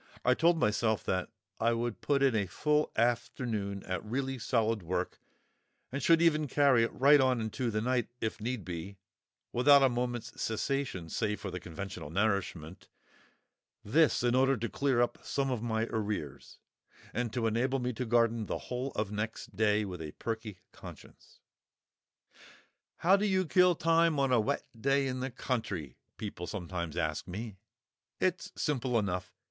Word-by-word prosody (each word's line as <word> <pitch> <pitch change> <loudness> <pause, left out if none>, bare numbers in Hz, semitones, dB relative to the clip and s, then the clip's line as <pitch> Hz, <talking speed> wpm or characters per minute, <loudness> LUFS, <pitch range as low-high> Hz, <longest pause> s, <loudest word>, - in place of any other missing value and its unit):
I 125 - +6
told 165 +5 +3
myself 110 -1 +1 0.5
I 115 +1 +3
would 115 -3 -3
put 140 -1 +2
in 135 -3 +4
a 100 -3 +1
full 150 - +1
afternoon 110 -4 -1
at 90 - -3
really 130 +4 -3
solid 115 -2 +1
work, 90 +2 -3 0.7
and 140 +1 -3
would 165 0 +6
even 155 -2 +3
carry 140 -3 +4
it 115 - +1
right 140 +2 +6
on 130 -2 +2
into 115 +2 -2
the 110 -1 -1
night, 125 0 +1
if 110 -1 -3
need 120 -1 -3
be, 90 +3 -6 0.6
without 140 +3 +6
a 135 - +5
moment's 120 -1 -3
cessation 115 -5 -2
save 105 +5 -1
for 100 - -5
the 90 - -4
conventional 90 -2 -7
nourishment—this, 100 - -2
in 120 0 +2
order 135 +1 +3
to 115 +1 -3
clear 135 -4 +1
up 120 - -3
some 135 -1 -1
of 125 -4 -2
my 110 -1 0
arrears, 100 - -4 0.6
and 120 -2 -1
to 120 -2 -1
enable 120 +4 +1
me 125 -1 -2
to 125 - -3
garden 115 -2 +2
the - - -2
whole 125 +2 -4
of 105 -1 -2
next 105 -1 -4
day 105 0 +2
with 90 -4 -6
a 75 -2 -6
perky 110 -3 -5
conscience. - - -14 1.6
"How 185 +3 +5
do 205 +1 +1
you 190 -1 +2
kill 180 +1 +4
time 165 -1 +3
on 135 -1 +2
a 125 - +5
wet 110 - 0
day 135 +4 +1
in 130 -1 -2
the 130 +1 -2
country?" 110 - -4 0.2
people 100 -5 -6
sometimes 85 -4 -4
ask - - -1
me. 105 +2 -6 0.6
It's 185 -1 0
simple 130 -5 0
enough. 90 -4 -2
115 Hz, 160 wpm, -31 LUFS, 105-135 Hz, 1.6 s, I